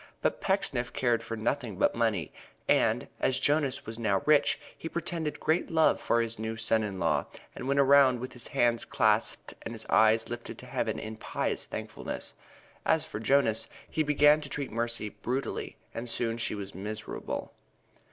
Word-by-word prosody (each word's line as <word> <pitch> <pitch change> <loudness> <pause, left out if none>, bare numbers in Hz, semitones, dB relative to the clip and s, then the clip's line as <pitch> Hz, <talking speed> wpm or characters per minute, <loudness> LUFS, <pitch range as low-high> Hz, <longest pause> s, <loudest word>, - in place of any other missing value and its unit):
But - - 0
Pecksniff 140 -11 +1
cared 120 -2 +1
for 115 0 -5
nothing 115 -2 -2
but - - +3
money, 110 -8 0 0.3
and, - - +3
as 130 - +2
Jonas 145 -3 +1
was 110 +1 -6
now 100 -4 +1
rich, 150 -1 +4 0.2
he 165 - -6
pretended 165 -2 -3
great 160 +3 +1
love 160 -1 +4
for 120 - +2
his 115 -1 -3
new 110 0 -3
son 115 -1 +2
in 100 -3 -4
law - - +1 0.3
and 125 - -6
went 140 +1 +2
around 135 -2 +6
with 130 +2 -6
his 120 -2 -6
hands 120 -1 +2
clasped - - +1
and 115 - -6
his 110 - -1
eyes 110 +1 +5
lifted 120 0 -6
to - - -11
Heaven - - -2
in 110 0 -6
pious - - -2
thankfulness. - - -6 0.5
As - - +2
for - - -6
Jonas, 115 -2 +2 0.2
he 155 - -1
began 150 0 +5
to 145 - -6
treat 140 -1 -3
Mercy 115 -1 -1
brutally 125 +6 -3 0.2
and 120 +1 -5
soon 115 0 -1
she 115 - -1
was 100 -1 -6
miserable. 105 +4 -5
120 Hz, 175 wpm, -29 LUFS, 110-140 Hz, 0.5 s, around